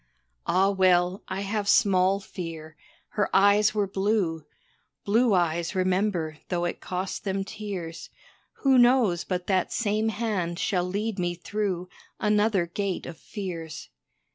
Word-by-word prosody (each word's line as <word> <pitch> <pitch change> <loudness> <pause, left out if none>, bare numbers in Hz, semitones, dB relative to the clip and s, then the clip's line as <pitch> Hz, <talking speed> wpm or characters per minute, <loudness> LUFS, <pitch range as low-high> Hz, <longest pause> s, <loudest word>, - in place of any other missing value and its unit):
Ah 190 +2 +3
well, 185 -1 +3
I 190 +1 -3
have 205 0 -2
small 190 0 +4
fear 165 -5 -8 0.3
her 210 - 0
eyes 205 +2 +5
were 205 -1 +2
blue; 190 -5 -1 0.6
Blue 225 +1 +3
eyes 170 +1 0
remember 185 -4 0
though 175 -1 0
it 175 - -4
cost 185 +1 -4
them 195 -1 -1
tears. 195 -5 -6 0.5
Who 265 -2 +5
knows 240 -8 +4
but 180 -1 -3
that 190 -2 +1
same 215 -1 0
hand 205 -6 -2
shall 180 -1 0
lead 205 +2 -2
me 175 -1 -1
through 185 -1 -3 0.3
Another 210 -3 +2
Gate 190 +2 -3
of 170 - -7
Fears. 165 -4 -7
190 Hz, 135 wpm, -26 LUFS, 175-210 Hz, 0.6 s, eyes